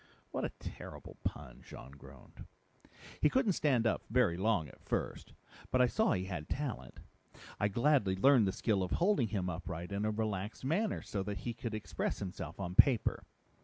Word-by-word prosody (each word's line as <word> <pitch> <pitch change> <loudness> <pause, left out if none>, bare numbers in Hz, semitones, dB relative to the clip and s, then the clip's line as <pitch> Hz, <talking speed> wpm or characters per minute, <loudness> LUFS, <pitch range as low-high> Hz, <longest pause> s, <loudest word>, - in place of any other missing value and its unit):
"What - - -2
a - - 0
terrible - - -9
pun," 65 -4 -5
Jean 65 - -11
groaned. 70 -1 -14 0.7
"He 150 - +5
couldn't 260 - +3
stand 135 -9 +2
up 110 - +2
very 115 -7 +3
long 95 -3 +1
at - - -16
first. - - -3 0.4
But 130 - +2
I 125 - +7
saw 220 - +2
he 95 - -1
had 85 -5 -5
talent. 120 - -4 0.6
I 105 - +3
gladly 120 -2 +2
learned 120 +1 +5
the - - +1
skill 100 0 0
of 90 - -2
holding 175 - +3
him 95 -3 -2
upright 90 0 -5
in 100 +1 -1
a 110 - +1
relaxed 105 +1 -3
manner 200 +9 0
so 100 - -3
that 100 +1 -4
he 120 - -1
could 115 -1 -4
express 110 - -2
himself 90 -3 -6
on 90 -2 -3
paper. 120 +3 +4
105 Hz, 180 wpm, -34 LUFS, 90-125 Hz, 0.7 s, I